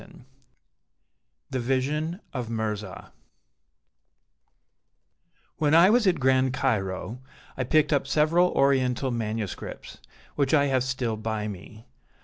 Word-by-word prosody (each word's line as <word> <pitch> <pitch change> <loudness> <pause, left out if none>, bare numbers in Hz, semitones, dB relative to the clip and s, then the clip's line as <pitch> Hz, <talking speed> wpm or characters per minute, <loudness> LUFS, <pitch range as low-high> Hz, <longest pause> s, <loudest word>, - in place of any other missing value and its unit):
Scott 180 - -17 1.4
THE 130 - -1
VISION 145 - -1
OF 125 -4 -4
MIRZAH 105 -4 -4 2.5
When 155 0 +2
I 175 +4 +7
was 235 -2 +3
at 175 -5 +2
Grand 130 0 +2
Cairo, 110 -3 -2 0.4
I 130 - -2
picked 155 +4 +2
up 140 -1 +1
several 155 +5 +3
Oriental 130 -1 +2
manuscripts, 110 -3 -5 0.4
which 140 +1 +2
I 145 -1 +4
have 130 -3 +1
still 130 -4 -2
by 110 -1 -3
me. 105 +3 -10
130 Hz, 115 wpm, -26 LUFS, 110-150 Hz, 2.5 s, I